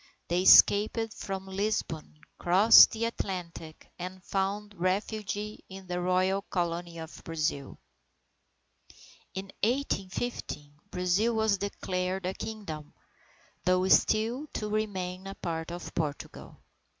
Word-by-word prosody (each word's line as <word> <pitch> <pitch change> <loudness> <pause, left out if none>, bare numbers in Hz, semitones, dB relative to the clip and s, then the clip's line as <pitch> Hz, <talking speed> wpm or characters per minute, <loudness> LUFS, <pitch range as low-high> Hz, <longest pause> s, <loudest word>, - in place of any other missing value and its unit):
They 175 +1 +2
escaped 215 +4 +6
from 190 -1 -5
Lisbon, 190 -6 -3 0.2
crossed 190 +6 +8
the 225 +1 -2
Atlantic, 175 -7 -5
and 185 +1 -7
found 200 +2 -2
refuge 200 +3 -1
in 205 -2 -8
the 180 0 -3
royal 185 +2 +1
Colony 175 -2 -3
of 160 0 -9
Brazil. 155 -4 -3 1.6
In 190 0 -6
1815, 205 - -2 0.2
Brazil 185 +6 +1
was 220 -3 +2
declared 185 -2 -3
a 185 - -1
Kingdom, 165 -11 -7 0.7
though 185 +1 +2
still 230 +10 +3
to 210 -1 -3
remain 190 -3 -3
a 195 - -7
part 165 -1 -4
of 175 +1 -7
Portugal. 150 -3 -5
190 Hz, 110 wpm, -29 LUFS, 175-210 Hz, 1.6 s, crossed